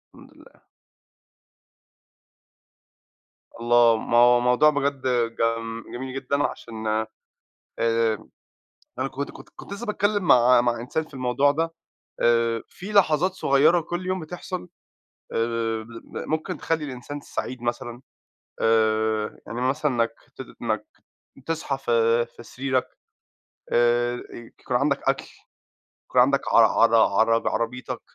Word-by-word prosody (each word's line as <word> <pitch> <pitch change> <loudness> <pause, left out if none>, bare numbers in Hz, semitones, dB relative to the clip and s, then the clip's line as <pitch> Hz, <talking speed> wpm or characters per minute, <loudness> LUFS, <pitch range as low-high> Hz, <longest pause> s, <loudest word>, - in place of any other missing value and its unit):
الحمد - - -16
لله. - - -21 2.9
الله، 120 -1 +4
ما 115 +1 0
هو 120 0 +6
موضوع 125 +5 +4
بجد 140 -2 -1 0.4
جم 115 0 -1
جميل 130 +1 -6
جدًا 140 +2 -1
عشان 110 -5 -5 0.9
آآ، 115 -1 +1 0.7
أنا 130 +1 -1
كنت 140 +1 -5
كنت - - -14
كنت - - -10
لسه 215 +4 -6
باتكلم 205 -1 0
مع 125 -5 +6
مع 120 -1 0
إنسان 140 +7 -2
في 155 - -17
الموضوع 130 +2 +2
ده 165 +2 -1 0.5
آآ، 115 -1 +2
في 195 +3 -9
لحظات 185 -3 +3
صغيّرة 155 +1 +3
كل 175 +3 -5
يوم 185 0 -1
بتحصل 180 +2 -6 0.7
آآ، - - -1 0.5
مل 115 +1 -9
ممكن 155 0 -2
تخلّي 160 -2 -2
الإنسان 140 +2 -7
سعيد 130 -3 -5
مثلًا 120 0 -4 0.6
آآ، 110 -1 +1
إن 105 - -7
مثلًا 135 +5 0
مك 115 -2 0 0.2
ت - - -7 0.2
إنك - - -2 0.6
تصحى 160 -4 -2
في 115 -2 +2
في 120 0 -15
سريرك 130 +2 -2 0.9
آآ، 120 0 +3 0.2
ي 120 -1 -11
يكون 130 -2 -1
عندك 140 +4 0
أكل، - - 0 0.8
يكون 125 - +4
عندك 140 +2 +4
عر 115 - +7
عرا 115 +1 +4
عر 115 +3 +2
عربيتك 125 +2 -3
125 Hz, 125 wpm, -24 LUFS, 115-145 Hz, 2.9 s, عر